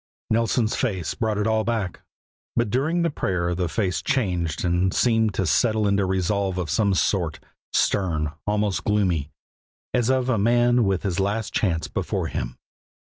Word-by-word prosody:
Nelson's 115 0 +1
face 95 - -1
brought 110 -2 -1
it 105 - 0
all 110 0 +2
back; 110 -6 -2 0.5
but 115 -3 +1
during 155 +7 +1
the 170 - +1
prayer 90 -9 -1
the 90 -1 -1
face 95 -2 -1
changed 90 - -1
and 90 +2 +2
seemed 110 -2 +2
to 95 - 0
settle 110 +4 +2
into 100 -1 +2
resolve 95 0 0
of 85 -5 -2
some 100 +2 +2
sort, 85 -4 0 0.3
stern, 80 -6 +1 0.2
almost 105 -2 0
gloomy, 90 -8 +1 0.6
as 120 -1 +1
of 130 -1 +2
a 125 -5 +1
man 120 +2 +3
with 95 0 0
his 95 -3 -1
last 105 +2 -1
chance 80 -6 0
before - - -2
him. - - -4
100 Hz, 160 wpm, -24 LUFS, 90-115 Hz, 0.6 s, man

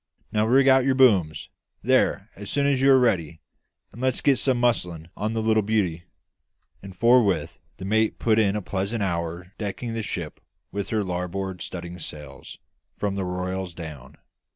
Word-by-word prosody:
Now 105 +1 +1
rig 135 +3 +4
out 130 -1 +6
your 135 0 +2
booms, 100 -12 +3 0.3
there, - - +2
as 100 0 -8
soon 140 +4 +1
as 140 -2 +2
you 135 0 +6
are 135 - +7
ready, 90 - +1 0.5
and 115 - -11
let's 130 -1 +1
get 140 -2 +3
some 130 -3 +2
muslin 90 -9 0
on 110 +2 -2
the 110 -1 -1
little 110 0 +3
beauty." 95 -6 -1 0.8
And 95 -1 -11
forthwith 105 -10 +3 0.2
the 95 - -7
mate 110 +2 +1
put 110 -1 +2
in 100 -2 +2
a 105 - -3
pleasant 100 +4 -2
hour 85 0 -3
decking 115 +3 -4
the 115 - -2
ship 85 -7 -5 0.3
with 100 +1 -4
her 110 -2 0
larboard 90 +1 -4
studding 90 0 -7
sails, 75 -2 -9 0.4
from 100 -1 -1
the 100 -1 -2
royals 90 0 -4
down. 80 -7 -9
100 Hz, 175 wpm, -25 LUFS, 90-115 Hz, 0.8 s, are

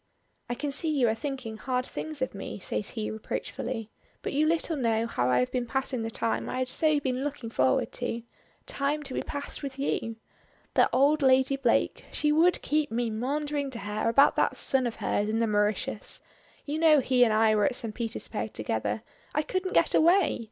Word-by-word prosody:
"I 240 - -1
can 290 +3 -3
see 320 +3 +2
you 275 -6 +2
are - - +2
thinking 255 -3 -5
hard 250 +1 -1
things 310 -1 -4
of 260 - -3
me," 195 - -6
says 205 +1 -3
he 220 -2 -4
reproachfully; 225 +1 -5 0.3
"but - - -3
you 300 +2 +2
little 330 0 +1
know 230 -4 +1
how 125 - 0
I 125 - +3
have 125 0 +1
been 245 -1 -1
passing 265 0 -1
the 225 - -2
time 225 0 -2
I - - -3
had 255 0 -1
so 310 0 +2
been 260 -1 -2
looking 275 -6 -4
forward 130 - +2
to. 235 -1 -2 0.4
Time 290 +2 -1
to 270 -2 -7
be - - -1
passed 285 0 -4
with 275 -2 -6
you. 230 -4 -2 0.6
That - - +4
old 285 +4 +3
Lady 265 0 +4
Blake 260 -4 +1
she 300 - +1
would 335 +4 +3
keep 300 0 +1
me 230 0 -1
maundering 285 +5 -2
to 255 - -7
her 210 +2 -1
about 275 +5 +5
that - - +2
son 260 -2 +2
of 230 - -4
hers 205 +1 -1
in 220 - 0
the 230 - +2
Mauritius; 210 -1 0 0.4
you 300 +2 -2
know 315 -2 +6
he 255 -1 +3
and 230 - +3
I 215 0 +4
were 210 -1 +3
at 270 - +1
St. 225 -3 -3
Petersburg 230 +1 -4
together. - - -2 0.3
I 300 - +2
couldn't 370 +3 -2
get - - +4
away. 340 -1 +4
260 Hz, 205 wpm, -28 LUFS, 225-290 Hz, 0.6 s, know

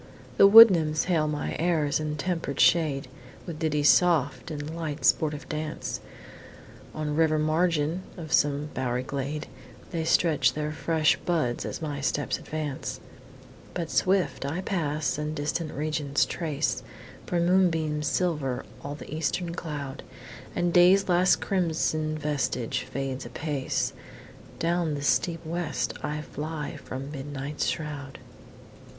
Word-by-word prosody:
The 195 - +9
wood 225 +2 +11
nymphs 155 -3 +1
hail 165 -4 +1
my 150 -1 -2
airs 160 -4 +1
and 150 -1 -3
temper'd 165 -4 -2
shade, 150 -6 +3 0.4
With 165 -4 -6
ditties 150 -2 +2
soft 145 -7 +3
and 150 +1 -5
lightly 160 -3 -4
sportive 150 -2 +2
dance, 155 0 -4 1.0
On 150 -1 -2
river 155 -1 +3
margin 160 +1 +1 0.2
of 160 -3 -6
some 145 +1 +2
bow'ry 125 -1 -1
glade, 140 +3 -4 0.5
And 160 -1 -1
strew 160 -4 +3 0.2
their 150 0 -2
fresh 160 0 +2
buds 155 -9 -1
as - - -5
my 145 -2 -3
steps 140 +2 -1
advance: 150 -3 -4 0.8
But, 170 -2 -3
swift 190 -5 +1
I 150 +6 -2
pass, 150 -7 -1
and 150 +1 -3
distant 155 +2 -2
regions 150 -1 0
trace, 155 -3 -2 0.5
For 175 - 0
moonbeams 165 -4 +2
silver 150 -9 -1 0.2
all 145 +1 -5
the 150 - -9
eastern 170 +2 -1
cloud, 145 -5 -5 0.5
And 175 -1 0
Day's 185 +2 +6
last 180 +1 +4
crimson 155 -4 0
vestige 135 -4 -1
fades 135 -1 -4
apace; 145 -4 -2 0.6
Down 170 -2 0
the 140 - -5
steep 160 +5 +1
west 170 -1 -2
I 150 0 -3
fly 150 0 -5
from 135 +2 -7
Midnight's 145 0 -4
shroud. 145 -3 -4
155 Hz, 130 wpm, -27 LUFS, 145-165 Hz, 1.0 s, wood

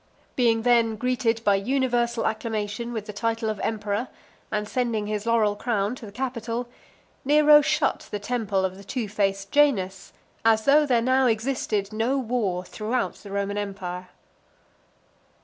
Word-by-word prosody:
Being 230 -3 +2
then 235 -2 +3
greeted 235 -1 0
by 205 - +4
universal 240 0 0
acclamation 220 +1 -2
with 220 -3 -4
the 210 - -7
title 225 +1 -1
of 210 - -6
Emperor, 210 +2 -2 0.4
and 210 -1 -1
sending 230 -3 -1
his 210 +1 -3
laurel 220 -3 +3
crown 210 -1 -1
to 225 - -10
the - - -10
Capitol, 240 0 -3 0.6
Nero 295 +1 +6
shut 300 -1 0
the 210 - -3
temple 205 -3 -1
of 190 0 -4
the 200 - -12
two 230 +2 -3
faced 195 -1 -1
Janus, 195 -11 +2 0.3
as 220 -1 +3
though 295 +2 +5
there 240 -3 +2
now 260 +1 +3
existed 220 -3 -1
no 230 +5 0
war 220 -8 -1
throughout 225 +6 -2
the 205 - -12
Roman 200 +1 -2
empire. 185 -3 -5
225 Hz, 150 wpm, -25 LUFS, 205-245 Hz, 0.6 s, Nero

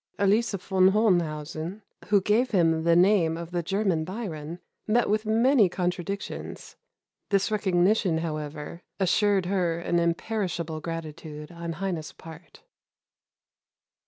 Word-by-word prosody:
Elise 205 +3 +2
von 190 0 +3
Hohenhausen, 175 -2 0 0.2
who 205 -1 +4
gave 225 +6 +2
him 165 -4 +2
the 170 0 +5
name 175 -3 +4
of 170 0 -7
the 175 -1 -1
German 195 -2 0
Byron, 170 -5 -6 0.3
met 235 +3 +2
with 215 +1 0
many 230 -1 +4
contradictions. 180 +2 -4 0.5
This 195 +1 +1
recognition, 190 -2 +2
however, 155 0 -5 0.2
assured 195 0 +2
her 180 -3 0
an 170 0 0
imperishable 170 -2 -2
gratitude 155 -1 -7
on 170 -1 -5
Heine's 170 -2 -4
part." 160 -1 -13
175 Hz, 115 wpm, -26 LUFS, 165-200 Hz, 0.5 s, the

